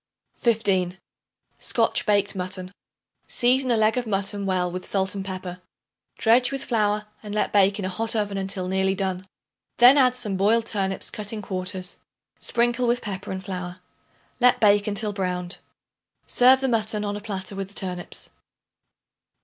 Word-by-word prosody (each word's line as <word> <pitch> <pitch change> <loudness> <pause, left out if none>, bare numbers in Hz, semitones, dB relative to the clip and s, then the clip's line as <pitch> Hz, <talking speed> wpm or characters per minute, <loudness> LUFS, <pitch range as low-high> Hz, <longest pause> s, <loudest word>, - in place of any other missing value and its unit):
15. 195 -6 +1 0.6
Scotch - - +1
Baked 200 -1 +2
Mutton. 185 0 -4 0.6
Season 255 +2 +2
a 235 - +3
leg 220 +2 +2
of 245 - -5
mutton 200 0 -1
well 180 -2 0
with 185 +1 -5
salt 190 -1 -1
and 195 -1 -4
pepper. 185 -1 -6 0.6
Dredge 245 +3 +4
with 275 -1 -3
flour 210 -2 0 0.2
and 210 -1 -6
let 215 - 0
bake 200 -1 +4
in 200 - -3
a - - -1
hot 225 +4 -2
oven 205 -2 -1
until 190 -1 -3
nearly 190 +1 +1
done. 190 -1 -3 0.5
Then 250 +4 +8
add 255 -2 +4
some 210 -6 -1
boiled 220 +4 +3
turnips 195 -3 -3
cut 210 -1 -5
in 215 -2 -5
quarters; 185 0 -2 0.4
sprinkle 240 +1 +1
with 240 +1 +1
pepper 195 -3 -5
and 190 0 -5
flour; 180 -1 -5 0.6
let 250 0 +4
bake 205 -1 +4
until 210 0 -1
browned. 180 -2 -2 0.7
Serve 260 +2 +5
the 265 - +1
mutton 215 -3 0
on 205 0 -2
a 205 - -6
platter 195 -2 -6
with 195 -1 -4
the 200 - -13
turnips. 180 -2 -2
200 Hz, 165 wpm, -24 LUFS, 190-225 Hz, 0.7 s, Then